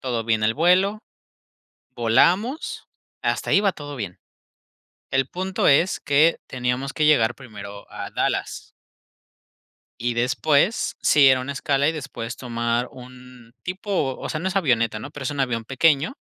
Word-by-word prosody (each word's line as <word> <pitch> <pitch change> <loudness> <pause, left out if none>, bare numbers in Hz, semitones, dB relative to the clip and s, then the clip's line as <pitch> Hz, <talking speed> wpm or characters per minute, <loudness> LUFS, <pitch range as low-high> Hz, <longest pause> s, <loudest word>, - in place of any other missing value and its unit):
todo 120 -3 -2
bien 110 -1 +1
el 110 - +3
vuelo, 185 - +3 1.0
volamos, 180 - +1 0.4
hasta - - -1
ahí 200 - +4
va 200 -2 +2
todo 145 -3 -8
bien. 100 -7 -6 0.9
El 135 -1 +1
punto 185 +3 -1
es 160 +6 +4
que 150 +4 +3
teníamos 125 +2 -2
que 155 - 0
llegar 120 -6 +4
primero 105 -5 -10
a - - -6
Dallas - - -2 1.3
y 120 +1 -1
después 140 - +1
sí, 145 -2 +5
era 130 -1 +4
una 140 +2 -5
escala 140 +1 0
y - - +3
después 130 -6 -6
tomar 120 0 -1
un 125 -2 -14
tipo, 180 -7 -2
o - - -6
sea, 155 - -3
no 180 - -2
es 190 - -3
avioneta, 115 - +1
¿no? 145 - -8
Pero 145 -3 -8
es 145 - -2
un 145 - -5
avión 120 -4 -1
pequeño, 150 - +2
135 Hz, 155 wpm, -23 LUFS, 120-155 Hz, 1.3 s, sí